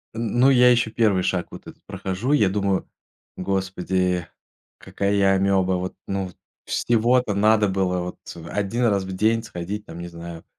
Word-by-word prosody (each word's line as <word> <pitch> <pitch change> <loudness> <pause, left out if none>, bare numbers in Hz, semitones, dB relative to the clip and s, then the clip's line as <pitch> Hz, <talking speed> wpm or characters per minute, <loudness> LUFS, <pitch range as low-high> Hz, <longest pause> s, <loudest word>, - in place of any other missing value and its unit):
Н 115 +1 -2
ну, 130 +2 +6
я 125 -1 +6
еще 120 -2 +2
1 105 -6 +2
шаг 90 -2 -1
вот - - -11
этот - - -13
прохожу. 100 +9 -2
И 150 - +5
я 100 -3 +3
думаю: 100 -1 -1 0.5
"Господи, 95 -2 -1 0.5
какая 100 0 -2
я 100 -1 +3
амеба, 95 -1 +2
вот, 90 +1 -3
ну". 95 -2 -3 0.3
Всего-то 120 0 +2
надо 105 +1 +3
было 95 -1 0
вот 90 0 -6 0.3
1 105 +6 -1
раз 100 -4 +2
в 95 - -7
день 110 +4 +1
сходить 105 +2 -6
там, 80 -1 -10
не 85 - -6
знаю, 85 -1 -9
100 Hz, 170 wpm, -23 LUFS, 95-110 Hz, 0.5 s, ну